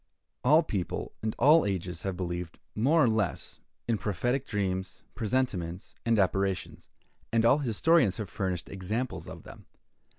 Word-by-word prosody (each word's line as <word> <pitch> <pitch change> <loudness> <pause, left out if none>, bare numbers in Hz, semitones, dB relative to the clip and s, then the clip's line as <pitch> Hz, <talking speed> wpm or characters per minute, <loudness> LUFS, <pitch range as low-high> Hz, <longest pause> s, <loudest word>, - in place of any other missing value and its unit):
All 150 +6 +6
people 100 - -3
and 110 0 -2
all 155 +3 +6
ages 90 -3 -3
have 95 -2 -3
believed, 85 -2 -4 0.2
more 150 +9 +3
or - - +5
less, 110 -4 -1 0.3
in 115 -3 +1
prophetic 120 - -1
dreams, 95 -3 -2
presentiments, 100 -7 -2
and 115 -1 +4
apparitions; 95 -1 0 0.4
and 115 0 +3
all 135 +5 +5
historians 130 - +3
have 110 -3 -4
furnished 90 -2 -3
examples 105 +7 -3
of - - -9
them. - - -13
105 Hz, 140 wpm, -29 LUFS, 95-125 Hz, 0.4 s, All